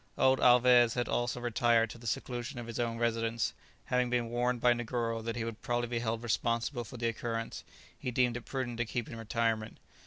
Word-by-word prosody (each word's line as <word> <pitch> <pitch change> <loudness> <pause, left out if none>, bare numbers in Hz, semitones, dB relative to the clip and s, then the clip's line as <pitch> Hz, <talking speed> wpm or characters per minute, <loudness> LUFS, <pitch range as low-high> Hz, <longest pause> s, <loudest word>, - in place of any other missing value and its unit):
Old 130 0 +4
Alvez 125 -1 +6
had 120 -1 0
also 120 0 -1
retired 120 -1 +2
to 120 - -10
the 120 - -8
seclusion 120 +2 -3
of 120 - -5
his 115 0 -6
own 115 -1 -1
residence; 115 -1 0 0.3
having 125 -1 +1
been 120 -1 0
warned 120 +1 0
by 120 +1 +5
Negoro 115 -1 -2
that 115 0 -3
he 120 - -2
would 115 -1 -5
probably 120 0 -1
be 120 -1 -1
held 115 0 -2
responsible 120 +2 0
for 125 +3 -10
the 115 0 0
occurrence, 115 0 -3 0.3
he - - -4
deemed 125 -1 +2
it 120 - -4
prudent 120 -1 -4
to 120 - +1
keep 120 +1 -3
in - - -7
retirement. 115 -1 -1
120 Hz, 210 wpm, -32 LUFS, 115-120 Hz, 0.3 s, Alvez